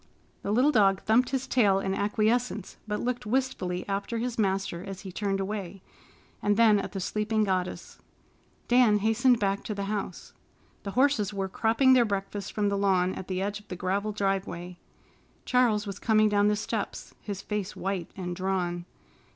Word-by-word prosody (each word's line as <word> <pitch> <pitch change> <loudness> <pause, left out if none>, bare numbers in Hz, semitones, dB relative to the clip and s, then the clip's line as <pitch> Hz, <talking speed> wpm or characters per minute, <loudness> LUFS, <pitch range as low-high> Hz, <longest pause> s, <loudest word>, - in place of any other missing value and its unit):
The 200 - -3
little 255 +7 +4
dog 195 -6 +4
thumped 240 +3 +3
his 265 -1 -1
tail 210 -7 +3
in 190 0 -1
acquiescence, 215 +1 0
but 210 0 -2
looked 245 -2 -2
wistfully 210 -8 -1
after 200 +4 -2
his 240 0 -3
master 195 -3 0
as 195 -1 -7
he 190 - -8
turned 195 +1 -1
away, 195 -1 -4 0.6
and 205 0 +2
then 220 -3 +6
at 195 - -5
the 195 - -3
sleeping 215 +3 0
goddess. 185 -2 -2 0.7
Dan 240 -4 +5
hastened 225 +4 +3
back 195 -1 0
to 210 - -3
the 200 - -3
house. 200 -2 -4 0.5
The 200 - -5
horses 250 -7 +2
were 195 -1 -1
cropping 230 +7 +3
their 250 -2 +6
breakfast 200 -1 -3
from 205 -1 0
the 200 - 0
lawn 190 -2 +2
at 190 - -7
the 185 0 -2
edge 205 +1 -3
of 210 - -21
the 180 - -5
gravel 195 +4 -1
driveway. 195 -3 -2 0.7
Charles 235 -4 +2
was 200 -1 -6
coming 215 -1 +3
down 205 0 +3
the 210 - +3
steps, 215 0 -4
his 200 -2 -6
face 210 -2 -3
white 190 -3 -3
and 180 -2 -4
drawn. 180 -2 -2
205 Hz, 175 wpm, -28 LUFS, 195-220 Hz, 0.7 s, then